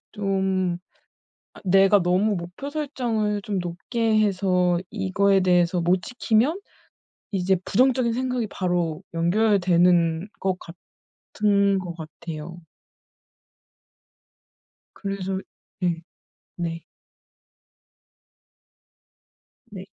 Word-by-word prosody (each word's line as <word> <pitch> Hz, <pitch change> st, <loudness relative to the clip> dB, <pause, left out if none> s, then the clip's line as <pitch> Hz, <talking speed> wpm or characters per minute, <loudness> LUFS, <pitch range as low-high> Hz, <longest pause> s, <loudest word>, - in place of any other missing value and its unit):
좀 190 Hz, -3 st, 0 dB, 0.7 s
아 -, -, -15 dB
내가 195 Hz, +2 st, +5 dB
너무 185 Hz, +4 st, +2 dB
목표 180 Hz, +11 st, -6 dB
설정을 235 Hz, -9 st, -1 dB
좀 200 Hz, -1 st, -2 dB
높게 215 Hz, +6 st, 0 dB
해서 185 Hz, -3 st, +2 dB
이거에 195 Hz, -1 st, +2 dB
대해서 180 Hz, -1 st, +3 dB
못 175 Hz, +2 st, +2 dB
지키면 250 Hz, -, +1 dB, 0.7 s
이제 190 Hz, -1 st, +2 dB
부정적인 255 Hz, +1 st, +2 dB
생각이 250 Hz, -1 st, -1 dB
바로 175 Hz, -3 st, -1 dB
연결되는 175 Hz, -2 st, +3 dB
것 190 Hz, -1 st, -1 dB, 0.6 s
같은 200 Hz, -1 st, +1 dB
것 180 Hz, -2 st, -6 dB
같아요. 165 Hz, +1 st, -8 dB, 2.3 s
그래서 195 Hz, -1 st, -3 dB, 0.4 s
네. 170 Hz, -2 st, 0 dB, 0.6 s
네. 165 Hz, -1 st, -4 dB, 2.9 s
네. 190 Hz, -2 st, -8 dB
190 Hz, 160 characters per minute, -24 LUFS, 175-210 Hz, 2.9 s, 내가